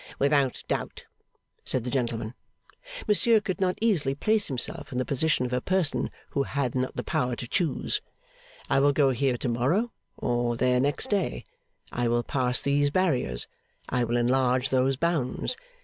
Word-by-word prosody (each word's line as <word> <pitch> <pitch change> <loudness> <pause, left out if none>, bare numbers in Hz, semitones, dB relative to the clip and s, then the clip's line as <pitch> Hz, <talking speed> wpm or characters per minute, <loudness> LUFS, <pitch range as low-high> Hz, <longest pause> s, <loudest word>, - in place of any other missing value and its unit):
Without 140 -2 +1
doubt,' - - -3 0.6
said 130 - -2
the 125 - -3
gentleman. 115 -3 -2 0.7
Monsieur 220 +2 +4
could 195 -1 -4
not 185 -1 +1
easily 165 -12 +2
place 215 +7 +3
himself 130 -4 -2
in 125 - -4
the 130 - 0
position 145 -1 +2
of 125 - -4
a 125 - 0
person 185 -3 0 0.2
who 140 - 0
had 140 -3 -1
not 130 0 -2
the - - -3
power 125 -1 -1
to 120 - -6
choose, 170 -2 -1 0.7
I - - +3
will 145 +1 +4
go 140 -2 +3
here 130 0 0
to 125 - -3
morrow, 140 - +1 0.3
or 120 -1 0
there 125 +1 +2
next 145 - 0
day; 190 - -1 0.5
I 120 0 0
will 120 0 +1
pass 125 0 0
these 145 +1 +2
barriers, 140 - +1 0.4
I 125 - +1
will 120 +1 0
enlarge 125 +1 +2
those 130 +1 +2
bounds. 165 - 0
135 Hz, 165 wpm, -27 LUFS, 125-155 Hz, 0.7 s, Monsieur